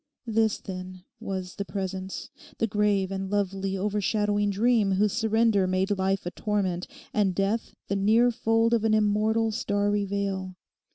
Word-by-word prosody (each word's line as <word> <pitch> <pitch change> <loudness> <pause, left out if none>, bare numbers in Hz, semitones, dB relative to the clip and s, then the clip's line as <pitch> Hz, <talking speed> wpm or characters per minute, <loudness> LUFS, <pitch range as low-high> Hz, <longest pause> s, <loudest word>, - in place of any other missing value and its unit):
This, 220 -2 +1
then, 185 -1 -8 0.2
was 185 -1 -5
the 200 - -1
presence, 190 +1 -5 0.3
the - - +1
grave 205 -3 +1
and 190 0 -3
lovely 195 -1 -1
overshadowing 205 +1 0
dream 210 0 +2
whose 205 +1 +2
surrender 220 -3 +2
made 190 +2 +1
life 190 0 0
a 175 - -3
torment, 190 -4 -1 0.3
and 195 -4 +1
death 200 +4 -1
the 200 - -1
near 220 +5 +4
fold 225 0 +2
of 230 -2 +2
an 220 -1 +3
immortal, 215 +1 +2
starry 205 -1 0
veil. 195 -2 -3
205 Hz, 150 wpm, -27 LUFS, 190-215 Hz, 0.3 s, near